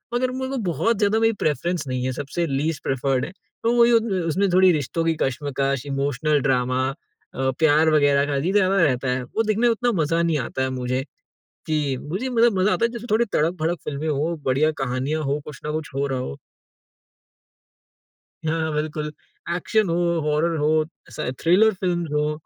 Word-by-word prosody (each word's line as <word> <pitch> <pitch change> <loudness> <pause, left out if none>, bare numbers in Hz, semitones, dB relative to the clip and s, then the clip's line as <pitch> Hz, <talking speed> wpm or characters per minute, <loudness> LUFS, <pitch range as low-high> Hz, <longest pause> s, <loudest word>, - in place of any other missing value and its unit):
मगर 255 +1 +1
मेरे 260 0 -4
को 270 - -2
बहुत 225 +6 +1
ज़्यादा 210 +1 +2
मेरी 225 0 +3
प्रेफरेंस 170 +4 0
नहीं 130 0 -2
है 130 - 0
सबसे 145 +6 -3
लीस्ट 145 +2 -2
प्रिफर्ड 135 0 0
हैं। 180 - -9 0.3
तो 230 +1 +2
मुझे 235 0 +6
उस 205 -7 +1
उसमें 190 +5 +1
थोड़ी 185 0 +6
रिश्तों 155 +2 -1
की 165 -1 +2
कशमकश, 140 0 -1
इमोशनल 140 +2 0
ड्रामा 130 0 +1
अ, 135 -2 -5
प्यार 155 0 +4
वगैरह 145 -2 +4
का 145 -1 -2
ही 185 - +1
ज़्यादा 195 -1 +3
रहता 130 -3 +1
है, 125 0 -1
वो 220 - -1
देखने 215 +1 0
में - - +5
उतना 240 +1 0
मज़ा 165 +3 +1
नहीं 165 -3 +1
आता 130 +2 -3
है 130 - 0
मुझे, 130 0 -2 0.6
कि 145 -4 0
मुझे 190 - -3
मतलब 230 -5 +3
मज़ा 195 +3 +3
आता 235 - +2
है 235 - -1
जैसे 240 0 -7
थोड़ी 230 +2 +3
तड़क-भड़क 165 -2 0
फ़िल्में 150 +2 -3
हो, 155 +3 0
बढ़िया 145 +4 +2
कहानियाँ 135 +5 -2
हो, 140 +1 -1
कुछ 150 - -9
न 150 - -2
कुछ 155 -1 -4
हो 140 +1 0
रहा 130 -1 -2
हो। 70 - -5 2.1
हाँ, 160 0 -1
बिल्कुल। 150 0 -3 0.4
एक्शन 215 +2 +1
हो, 165 - 0 0.3
हॉरर 155 +2 0
हो, 155 +1 +2 0.3
स - - -8 0.2
थ्रिलर 205 +6 +5
फ़िल्म्स 175 -4 -2
हो, 150 0 +1
155 Hz, 185 wpm, -23 LUFS, 140-185 Hz, 2.1 s, मुझे